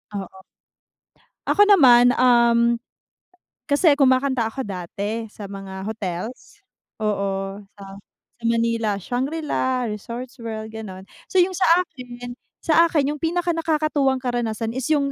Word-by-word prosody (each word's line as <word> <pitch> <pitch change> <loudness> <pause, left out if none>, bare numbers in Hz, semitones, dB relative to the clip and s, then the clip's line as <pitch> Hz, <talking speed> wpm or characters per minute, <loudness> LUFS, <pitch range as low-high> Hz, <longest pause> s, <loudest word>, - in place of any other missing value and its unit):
Oo. 190 -1 -7 1.0
Ako 410 - +5
naman, 250 -11 +6
um, 235 -1 +4 0.9
kasi 290 +2 +4
kumakanta 260 -3 +3
ako 265 +4 -5
dati, 205 +4 -5
sa 210 - -12
mga 190 -1 -7
hotels, 220 - -6 0.4
oo, 195 -1 -2 0.2
sa 200 - -12 0.6
sa - - -23
Manila, 230 -2 +1
Shangri-La, 260 - -2
Resorts 240 +4 -7
World, 220 -1 -6
gano'n. 195 -4 -8 0.2
So, - - -16
yung 365 +1 +4
sa 370 - +1 0.2
akin, 245 -4 -10 0.3
sa 330 +1 +5
akin 295 -3 +1
yung 300 - -8
pinakanakakatuwang 315 -5 0
karanasan 230 -3 -2
is 255 +1 -4
yung, 285 -3 +1
240 Hz, 120 wpm, -22 LUFS, 215-285 Hz, 1.0 s, naman